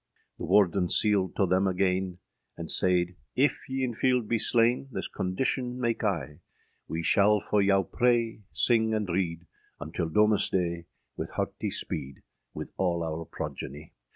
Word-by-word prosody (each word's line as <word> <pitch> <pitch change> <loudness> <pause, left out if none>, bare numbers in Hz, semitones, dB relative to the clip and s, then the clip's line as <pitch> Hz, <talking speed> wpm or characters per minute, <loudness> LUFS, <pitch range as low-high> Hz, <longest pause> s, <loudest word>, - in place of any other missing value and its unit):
The - - -4
Warden 95 -1 +3
sealed 100 -3 +3
toe 100 - +3
thayme 95 +2 +2
againe, 95 -1 0 0.4
And - - -3
sayde, 90 -1 +2 0.2
âIf 140 +3 +4 0.2
ye 130 0 -1
in 125 -2 -1
fielde 125 -1 +1
be 115 0 +1
slaine, 120 +4 +2
This - - -4
condition 125 +6 -2
make 120 -1 -1
I: 80 -7 -2 0.5
âWee 80 +1 -3
shall 105 +1 +4
for 105 +1 +1
yow 95 -1 +3
praye, 120 +2 +1
syng, 110 -2 +3
and 105 -2 -1
reade, 85 -2 -2 0.3
Until 80 +1 -3
Domesdaye 90 -4 +2 0.3
wyth - - -5
heartye - - -3
speede, 65 0 -5 0.3
With - - -7
al 85 -3 +1
our 80 0 -4
progenie. 70 +3 -7
95 Hz, 150 wpm, -28 LUFS, 90-115 Hz, 0.5 s, âIf